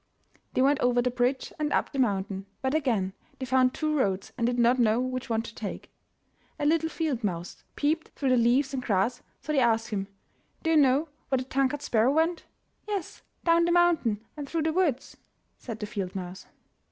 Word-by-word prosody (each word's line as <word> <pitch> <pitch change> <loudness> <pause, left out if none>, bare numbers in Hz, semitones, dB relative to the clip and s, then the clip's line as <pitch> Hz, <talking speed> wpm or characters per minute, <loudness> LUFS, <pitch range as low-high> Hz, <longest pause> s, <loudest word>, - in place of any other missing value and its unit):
They 255 - +4
went 280 +1 +3
over 245 0 +2
the 250 +1 +1
bridge 250 +2 0
and 300 -1 0
up - - +1
the 275 - -4
mountain, 195 -4 0 0.2
but 265 +1 0
again 230 -11 0 0.2
they 260 - -4
found 255 0 +3
two 310 -1 0
roads 195 -8 0
and 235 -2 0
did 245 0 0
not 240 +2 +4
know 225 -1 +3
which 255 -1 -3
one 225 -1 0
to 230 - -9
take. 210 -2 -7 0.7
A 290 - -2
little 320 +1 +2
field 300 -8 -2
mouse 175 -3 -4
peeped 310 +2 0
through 275 - 0
the 255 - +5
leaves 250 +4 +3
and 265 - -2
grass, 220 +1 0 0.2
so 305 - -4
they 280 - +3
asked 230 -2 +2
him, 195 -3 -2 0.6
"Do 325 - +1
you 320 - +5
know 285 +2 +4 0.2
where 265 - +2
the 255 - -2
tongue 265 +1 +1
cut 290 +1 -5
sparrow 230 +3 +3
went?'* 325 +3 +1 0.4
"Yes. 405 -5 -4 0.2
Down 335 0 +4
the 345 - +1
mountain 325 -12 +2
and 290 -2 -6
through 330 -2 -1
the 320 0 0
woods," 310 -8 0 0.4
said 225 -3 -7
the 210 - -3
field 195 -3 -4
mouse. 185 0 -6
255 Hz, 205 wpm, -27 LUFS, 225-300 Hz, 0.7 s, the